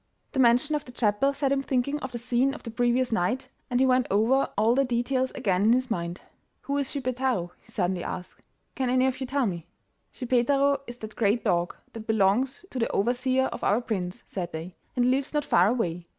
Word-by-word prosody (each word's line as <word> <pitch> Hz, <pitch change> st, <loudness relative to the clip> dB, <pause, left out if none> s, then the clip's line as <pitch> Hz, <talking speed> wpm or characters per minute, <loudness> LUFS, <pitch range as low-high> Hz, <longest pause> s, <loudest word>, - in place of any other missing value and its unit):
The 265 Hz, -, -2 dB
mention 250 Hz, +5 st, +4 dB
of 295 Hz, -1 st, 0 dB
the 250 Hz, -, -12 dB
chapel 240 Hz, +3 st, +2 dB
set 280 Hz, -1 st, -1 dB
him 275 Hz, 0 st, +2 dB
thinking 275 Hz, +2 st, -1 dB
of 265 Hz, -3 st, -6 dB
the 240 Hz, -, -4 dB
scene 250 Hz, +3 st, +1 dB
of -, -, -11 dB
the 230 Hz, -, -6 dB
previous 245 Hz, +2 st, +1 dB
night, 225 Hz, +5 st, 0 dB, 0.2 s
and 245 Hz, 0 st, +1 dB
he 265 Hz, -, +5 dB
went 255 Hz, -1 st, +3 dB
over 230 Hz, +7 st, +3 dB
all 220 Hz, +3 st, +4 dB
the 275 Hz, +2 st, +3 dB
details 255 Hz, +1 st, 0 dB
again 185 Hz, -3 st, +1 dB
in 220 Hz, +3 st, +5 dB
his 255 Hz, -1 st, 0 dB
mind. 170 Hz, -2 st, -3 dB, 0.4 s
'Who 280 Hz, -, -3 dB
is 275 Hz, -, -1 dB
Schippeitaro?' 255 Hz, -, -1 dB
he 230 Hz, -, -19 dB
suddenly 185 Hz, -4 st, -1 dB
asked; 185 Hz, 0 st, -7 dB, 0.3 s
'can 260 Hz, -2 st, -1 dB
any 255 Hz, +1 st, +3 dB
of 260 Hz, 0 st, -1 dB
you 260 Hz, -, -2 dB
tell 275 Hz, 0 st, +1 dB
me?' 170 Hz, -5 st, -4 dB, 0.4 s
'Schippeitaro 275 Hz, +3 st, +2 dB
is 240 Hz, 0 st, -8 dB
the 220 Hz, -, -6 dB
great 215 Hz, 0 st, 0 dB
dog 175 Hz, 0 st, +1 dB, 0.2 s
that 225 Hz, -1 st, -8 dB
belongs 220 Hz, -, +1 dB
to 260 Hz, -, -4 dB
the 230 Hz, -, +1 dB
overseer 255 Hz, +4 st, +1 dB
of -, -, -7 dB
our 205 Hz, +3 st, +3 dB
prince,' 210 Hz, -4 st, -4 dB
said 175 Hz, -3 st, -5 dB
they; 165 Hz, +3 st, -6 dB, 0.2 s
'and 245 Hz, -, +2 dB
he 250 Hz, -, +4 dB
lives 275 Hz, +3 st, -1 dB
not 295 Hz, -1 st, +1 dB
far 180 Hz, -8 st, +4 dB
away. 180 Hz, -7 st, -1 dB
245 Hz, 220 wpm, -27 LUFS, 205-265 Hz, 0.4 s, he